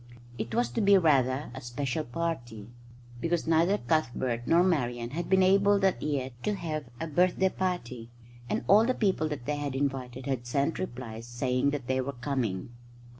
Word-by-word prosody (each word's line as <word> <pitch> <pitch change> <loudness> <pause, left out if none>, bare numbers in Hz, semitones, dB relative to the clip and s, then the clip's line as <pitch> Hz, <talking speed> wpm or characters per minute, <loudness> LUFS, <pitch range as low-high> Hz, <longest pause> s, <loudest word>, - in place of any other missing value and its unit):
It 110 0 -3
was 120 0 +2
to 120 - -2
be 200 -1 +6
rather 140 -5 +2
a 130 - -7
special 130 +4 -3
party, 120 -8 -4 0.5
because 170 +4 0
neither 165 +5 +3
Cuthbert 130 - -1
nor 170 +2 +5
Marian 120 -9 0
had 170 +4 -4
been 190 0 +5
able 200 +2 +5
that 195 -2 +1
year 140 -3 -2
to 210 - -1
have 155 -5 -4
a 165 - -2
birthday 180 +4 +2
party; 130 -12 -3 0.4
and - - -1
all 210 +2 +7
the 255 +2 +1
people 190 -7 +1
that 145 -5 -5
they 150 +2 -1
had 145 -2 -3
invited 130 -2 -3
had 130 -3 -2
sent 140 +5 0
replies 120 -8 -6
saying 125 +2 0
that 140 -3 -3
they 130 +1 0
were 140 +2 -4
coming. 120 -7 -2
140 Hz, 175 wpm, -29 LUFS, 120-170 Hz, 0.5 s, all